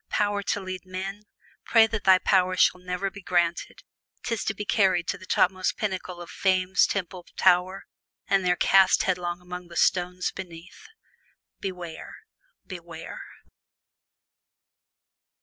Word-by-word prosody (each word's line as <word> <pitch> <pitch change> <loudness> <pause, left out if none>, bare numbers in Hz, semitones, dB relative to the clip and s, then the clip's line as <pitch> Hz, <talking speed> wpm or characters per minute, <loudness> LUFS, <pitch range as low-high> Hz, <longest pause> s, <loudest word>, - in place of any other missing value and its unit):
Power 205 -1 0
to 200 - -1
lead 185 -2 -6
men! 190 +3 -6 0.4
Pray 225 -1 +5
that 225 -2 -4
thy 190 -1 +7
prayer 185 -1 +2
shall 180 - +3
ne'er 180 +2 -3
be 200 - -11
granted 175 -2 -1 0.4
't 235 - -2
is 225 - -2
to 220 - -1
be 210 - -5
carried 190 -5 +2
to 200 - -1
the 185 - -13
topmost 185 0 +1
pinnacle 185 -3 -4
of 175 - -9
Fame's 185 -1 +2
temple 180 -2 -4
tower, 185 +1 +2 0.4
and 195 -1 +2
there 180 0 +2
cast 190 +1 +4
headlong 175 -1 -2
upon 180 0 -8
the 170 - -13
stones 180 0 +1
beneath. 180 - -11 0.7
Beware! 180 -4 -7 0.5
beware!! 170 -4 -9
185 Hz, 135 wpm, -26 LUFS, 180-195 Hz, 0.7 s, thy